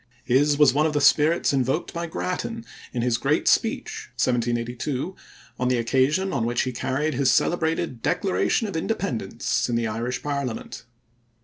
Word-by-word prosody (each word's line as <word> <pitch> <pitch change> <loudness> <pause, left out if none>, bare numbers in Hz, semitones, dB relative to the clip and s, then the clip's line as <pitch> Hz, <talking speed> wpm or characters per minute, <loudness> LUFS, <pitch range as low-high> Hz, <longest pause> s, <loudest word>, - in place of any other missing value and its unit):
His 145 +4 +3
was 145 -3 +6
one 150 +3 +3
of 155 - -2
the 145 - +1
spirits 150 +3 +4
invoked 135 +4 0
by 170 0 -3
Grattan 225 +7 -4 0.3
in 120 - -2
his 120 -1 +1
great 145 +5 +1
speech 435 - 0
(1782) 120 +6 -1 0.4
on 125 - +1
the 125 0 +2
occasion 135 +11 +1
on 115 - 0
which 120 +1 0
he 130 - -2
carried 135 +5 -1
his 130 +1 +2
celebrated 160 -7 +1
Declaration 200 +4 +1
of 200 - -6
Independence 140 - -2
in 120 - 0
the 115 0 0
Irish 115 +3 -3
parliament. 140 -6 -4
140 Hz, 155 wpm, -24 LUFS, 120-165 Hz, 0.4 s, was